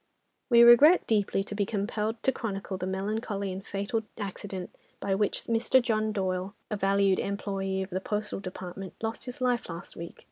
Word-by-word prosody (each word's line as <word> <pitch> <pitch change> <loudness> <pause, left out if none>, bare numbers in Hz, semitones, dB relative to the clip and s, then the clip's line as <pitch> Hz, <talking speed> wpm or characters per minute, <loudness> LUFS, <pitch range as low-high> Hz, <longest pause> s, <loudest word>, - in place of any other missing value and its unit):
"We 235 -1 +8
regret 280 +9 +8
deeply 205 -3 +1
to 205 - -7
be 205 0 +1
compelled 215 +2 -2
to 265 - +4
chronicle 200 -5 -4
the 185 0 -3
melancholy 200 +1 -2
and 190 +1 -6
fatal 200 +3 -2 0.2
accident 195 -2 -5 0.3
by 195 - -1
which 205 +1 0
Mr. 230 +3 +3
John 220 -3 0
Doyle, 190 -1 -2 0.2
a - - +1
valued 195 -1 +3
employé 195 -1 -2
of 190 - -9
the 185 +1 -2
Postal 210 +1 -3
Department, 185 0 -7
lost 225 0 -3
his 250 0 -8
life 245 -4 +1
last 165 0 -7
week. 170 0 -8
200 Hz, 175 wpm, -28 LUFS, 190-225 Hz, 0.3 s, We